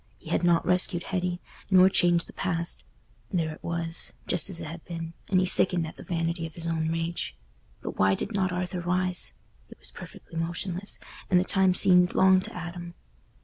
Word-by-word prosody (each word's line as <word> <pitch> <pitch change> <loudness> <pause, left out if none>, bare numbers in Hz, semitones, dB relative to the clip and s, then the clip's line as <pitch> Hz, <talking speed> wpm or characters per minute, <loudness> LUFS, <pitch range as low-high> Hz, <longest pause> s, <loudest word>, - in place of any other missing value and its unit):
He - - -10
had - - +1
not 170 -1 +3
rescued 180 -1 +2
Hetty, 180 -2 -2 0.3
nor 185 -1 +7
changed 175 -3 +3
the - - -14
past—there 165 - -4
it - - -15
was, 170 0 -2
just 175 +1 +1
as 180 -3 -2
it - - -5
had 160 +2 -8
been, 165 -1 -6 0.2
and 185 - +4
he 185 - +2
sickened 180 -2 +4
at 160 - -8
the - - -12
vanity 165 -1 -2
of 160 - -15
his 170 - -5
own 165 -1 -1
rage. 165 - -3 0.5
But - - -6
why 95 0 +4
did 230 - -4
not 190 -2 +1
Arthur 180 0 -3
rise? 180 +1 0 0.3
He - - -13
was - - -10
perfectly 165 - -9
motionless, 175 +3 -2 0.3
and 180 - +5
the - - +2
time 190 -1 +2
seemed 180 -2 +5
long 190 0 +6
to 185 - -6
Adam. 175 0 -7
175 Hz, 190 wpm, -27 LUFS, 165-185 Hz, 0.5 s, nor